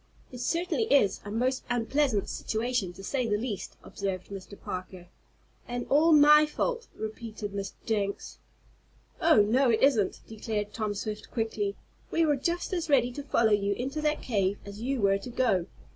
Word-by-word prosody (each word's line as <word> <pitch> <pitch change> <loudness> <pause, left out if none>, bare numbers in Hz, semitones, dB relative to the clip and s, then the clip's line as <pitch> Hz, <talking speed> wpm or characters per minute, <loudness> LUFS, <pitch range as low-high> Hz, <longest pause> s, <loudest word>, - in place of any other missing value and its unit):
"It 250 - -8
certainly 345 - 0
is 240 -9 +4
a 205 - -7
most 255 +5 0
unpleasant 245 -1 +1
situation, 225 -4 -2
to 195 - -11
say 250 +3 -1
the 210 -1 +1
least," 215 -3 -5
observed 190 -2 -4
Mr. 200 0 -9
Parker. 185 -1 -7 0.6
"And 245 0 -3
all 310 +4 +5
my 300 0 +7
fault," 470 +9 -2
repeated 220 -1 -6
Mr. 200 -1 -4
Jenks. 205 -3 -2 0.8
"Oh, 315 -11 +6
no 250 +5 +3
it 225 +1 +2
isn't," 230 -9 +3
declared 210 -1 -4
Tom 215 -2 -2
Swift, 210 +1 -5
quickly. 220 -3 -2 0.3
"We 330 - +2
were 295 -2 +3
just 340 +7 -2
as 335 -3 -2
ready 250 -4 +4
to 285 - -6
follow 230 -5 +2
you 200 -1 +2
into 270 +8 -3
that 305 0 0
cave 200 -4 0
as 200 +1 -9
you 260 0 -1
were 195 0 +3
to 200 - -8
go. 225 -8 +1
225 Hz, 170 wpm, -28 LUFS, 205-275 Hz, 0.8 s, my